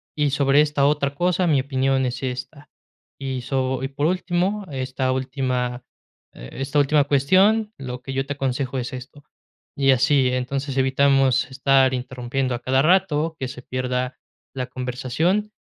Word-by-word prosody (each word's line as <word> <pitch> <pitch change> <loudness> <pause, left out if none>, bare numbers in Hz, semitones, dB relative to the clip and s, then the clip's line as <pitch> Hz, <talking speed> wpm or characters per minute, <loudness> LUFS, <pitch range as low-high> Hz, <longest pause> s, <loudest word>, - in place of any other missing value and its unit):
y 150 -1 +1
sobre 140 +1 +4
esta 150 -2 +1
otra 140 -1 +1
cosa, 180 +2 +1
mi 150 -4 +3
opinión 135 -1 0
es 125 -1 -3
esta 130 +3 -6 0.5
y 130 -2 -3
so, 130 0 -1
y 135 - 0
por 145 +1 -2
último, 185 +3 -1
esta 130 -1 -2
última, 130 -2 -2 0.5
eh - - -11
esta 135 +2 -3
última, 145 0 +3
cuestión, 190 +11 +3
lo 125 -2 -6
que 135 - -6
yo 135 0 -1
te 145 - -2
aconsejo 135 -1 -2
es 125 +1 -5
esto", 130 +3 -9 0.5
y 135 -1 +2
así, 135 0 +3
entonces 135 +2 -3
evitamos 135 -1 +3
estar 135 0 +3
interrumpiendo 125 +1 -3
a - - -5
cada 130 +1 +2
rato, 165 -2 +2
que 130 - -2
se 125 -1 -9
pierda 125 0 -3 0.4
la 130 -1 -3
conversación, 135 - -1
135 Hz, 155 wpm, -22 LUFS, 130-145 Hz, 0.5 s, sobre